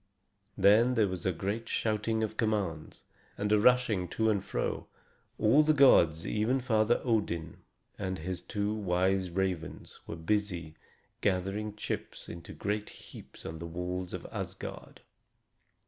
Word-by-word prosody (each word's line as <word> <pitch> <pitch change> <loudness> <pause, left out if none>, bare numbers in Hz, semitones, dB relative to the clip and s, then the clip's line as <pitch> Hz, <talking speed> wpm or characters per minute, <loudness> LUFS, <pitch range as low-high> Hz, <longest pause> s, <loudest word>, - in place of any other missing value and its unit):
Then 110 +6 +5
there 110 -3 +4
was 95 -1 -3
a - - +3
great 100 +6 -3
shouting 110 0 0
of 110 0 -3
commands, 100 -8 -2 0.3
and 105 0 -1
a 105 - +5
rushing 115 -5 +3
to 110 +5 +1
and 100 -3 0
fro. - - -3 0.5
All 115 +8 +5
the 155 0 +3
gods, 85 - +5
even 110 +5 +1
Father 115 -2 +2
Odin 85 - -1 0.4
and 95 -2 -2
his 90 +2 -4
two 105 0 -2
wise 95 -2 +1
ravens, 90 -2 -3
were - - -5
busy 85 -2 -1 0.5
gathering 100 +2 -1
chips 105 - -5
into 85 0 -9
great 105 +1 -3
heaps - - -13
on 80 0 -6
the 85 - -5
walls 90 +2 -4
of - - -6
Asgard. - - -6
100 Hz, 140 wpm, -31 LUFS, 90-110 Hz, 0.5 s, Then